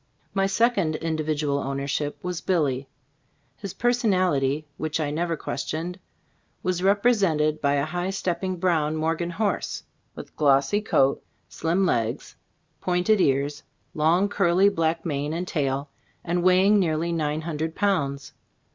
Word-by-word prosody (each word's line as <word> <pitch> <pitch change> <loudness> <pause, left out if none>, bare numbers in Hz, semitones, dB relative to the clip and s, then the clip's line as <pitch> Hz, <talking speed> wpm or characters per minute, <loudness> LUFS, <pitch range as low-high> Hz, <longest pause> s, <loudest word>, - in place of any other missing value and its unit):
My 195 -1 +2
second 195 -6 +2
individual 155 -3 -1
ownership 140 +2 -2
was 180 -2 -3
"Billy/' 140 -7 0 0.7
His 195 +3 -7
personality 185 - +1
(which 155 0 -2
I 150 -2 -1
never 165 +2 -1
questioned), 165 +7 -4 0.6
was 180 -1 -1
represented 195 -7 +2
by 140 -1 +2
a 140 0 +1
high 175 +3 -3
stepping 185 -1 -2
brown 160 -4 +1
Morgan 165 +2 -1
horse, 200 +2 -2 0.3
with - - -10
glossy 140 +7 +3
coat, 140 -10 +2 0.3
slim 175 +4 0
legs, 115 -9 -1 0.4
pointed 185 +3 +2
ears, 140 +1 +1 0.3
long 170 +4 +3
curly 195 -1 +3
black 165 -3 -1
mane 145 -1 -2
and 175 +2 -3
tail, 140 -2 -2 0.3
and 175 +1 0
weighing 185 +3 +5
nearly 165 -2 0
nine 155 -2 -1
hundred 160 0 -3
pounds. 140 -9 -1
165 Hz, 130 wpm, -25 LUFS, 150-185 Hz, 0.7 s, weighing